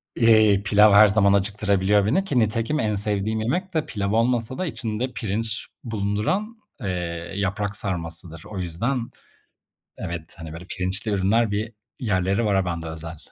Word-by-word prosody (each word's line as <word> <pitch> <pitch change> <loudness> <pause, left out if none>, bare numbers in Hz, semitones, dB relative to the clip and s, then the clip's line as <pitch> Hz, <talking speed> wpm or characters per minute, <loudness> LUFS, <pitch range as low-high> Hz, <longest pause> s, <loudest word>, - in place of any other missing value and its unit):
E, 110 -3 +5
pilav 105 -1 +5
her 105 +1 +8
zaman 100 -1 +4
acıktırabiliyor 100 0 +2
beni 145 - +2
ki 135 -9 +1
nitekim 115 +7 0
en 105 -1 0
sevdiğim 105 +2 0
yemek 180 - -2
de 160 -1 0
pilav 100 -2 -3
olmasa 115 +1 +1
da 185 - -2
içinde 120 -4 -3
pirinç 110 0 -2 0.2
bulunduran, 115 - -2 0.2
eee, 85 -2 -4
yaprak 100 +1 -1
sarmasıdır. 85 -3 0
O 100 -3 -6
yüzden 115 +9 -2 0.9
evet, 85 -2 -6
hani, 80 -1 -8
böyle, 85 +2 -9
pirinçli 95 +4 -2
ürünler, 100 +3 +2
bir 110 +3 -3 0.3
yerleri 100 -1 0
var 100 - +2
a 95 -1 +1
ben 85 -2 -3
de 80 - -7
özel. 80 0 -7
105 Hz, 160 wpm, -23 LUFS, 95-115 Hz, 0.9 s, her